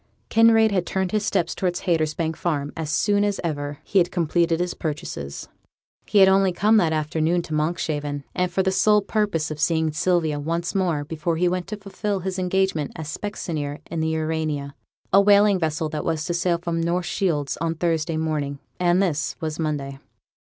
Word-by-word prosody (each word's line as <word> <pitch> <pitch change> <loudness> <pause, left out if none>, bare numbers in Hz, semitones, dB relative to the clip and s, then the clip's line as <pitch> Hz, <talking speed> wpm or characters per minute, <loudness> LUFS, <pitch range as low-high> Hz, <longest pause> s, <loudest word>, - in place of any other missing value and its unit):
Kinraid 225 -1 +5
had 185 -3 0
turned 190 -1 -1
his 215 -1 0
steps 195 -5 0
towards 180 -2 -2
Haytersbank 160 -1 0
Farm 145 -4 -2
as 160 -2 -4
soon 205 +6 +2
as 205 -1 0
ever 145 -3 -3
he 200 - +2
had 175 - +2
completed 170 -1 +1
his 180 0 -1
purchases. 145 - -5 0.6
He 210 - +1
had 190 -1 +8
only 190 0 +4
come 210 +5 +3
that 170 -6 +3
afternoon 160 +2 0
to 155 - -7
Monkshaven, 150 -2 -1
and 180 0 0
for 190 +2 +1
the 190 - +1
sole 210 +1 +4
purpose 200 -7 -1
of 155 - -6
seeing 160 -1 +1
Sylvia 160 -2 +1
once 170 +4 -2
more 175 -7 0
before 160 +2 -2
he 180 +2 +2
went 180 0 -1
to 215 +1 -5
fulfil 200 0 -3
his 190 +1 -3
engagement 185 -4 0
as 155 -1 -5
specksioneer 155 -8 -4
in 165 - -2
the 160 - 0
Urania, 155 -3 -2 0.4
a 195 - +8
whaling 200 -1 +5
vessel 160 -1 -1
that 150 -1 -4
was 160 -2 -1
to 175 - -1
sail 175 0 +1
from 170 -1 -2
North 175 +2 0
Shields 160 -6 -1
on 165 +1 -1
Thursday 165 -1 0
morning, 150 -3 -2 0.2
and 180 +1 +3
this 150 -6 -1
was 155 -1 -4
Monday. 140 -4 -3
170 Hz, 190 wpm, -23 LUFS, 155-190 Hz, 0.6 s, had